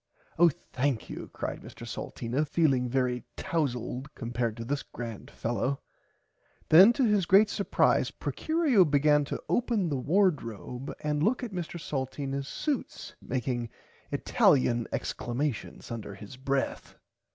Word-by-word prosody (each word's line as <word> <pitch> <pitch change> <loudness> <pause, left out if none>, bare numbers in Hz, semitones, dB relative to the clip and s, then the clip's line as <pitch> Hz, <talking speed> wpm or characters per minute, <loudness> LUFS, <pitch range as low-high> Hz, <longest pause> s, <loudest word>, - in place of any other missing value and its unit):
Oh 175 0 +8 0.2
thankyou 130 -2 -2
cried - - -4
Mr - - -10
Salteena 125 +6 -3
feeling 140 -5 +2
very 125 -1 0
towzld 130 -4 -2
compared 120 -2 -2
to 115 - -5
this 140 +2 -1
grand 115 -3 -8
fellow. 125 +4 -2 0.9
Then 185 +8 +9
to 265 - +1
his 205 -6 +2
great 205 +3 +6
supprise 200 - +2
Procurio 315 - +2
began 150 -1 +3
to - - -4
open 230 -7 +1
the 140 -3 -1
wardrobe 135 - 0
and 150 -1 0
look 235 +10 +2
at 235 - -4
Mr 175 -1 -4
Salteenas 135 -1 -3
suits 290 - -3
making 125 -2 -2 0.4
italian 120 -4 +3
exclamations 125 -1 -3
under 110 -4 -6
his 105 +5 -10
breath. 135 +1 -2
140 Hz, 125 wpm, -29 LUFS, 125-170 Hz, 0.9 s, Then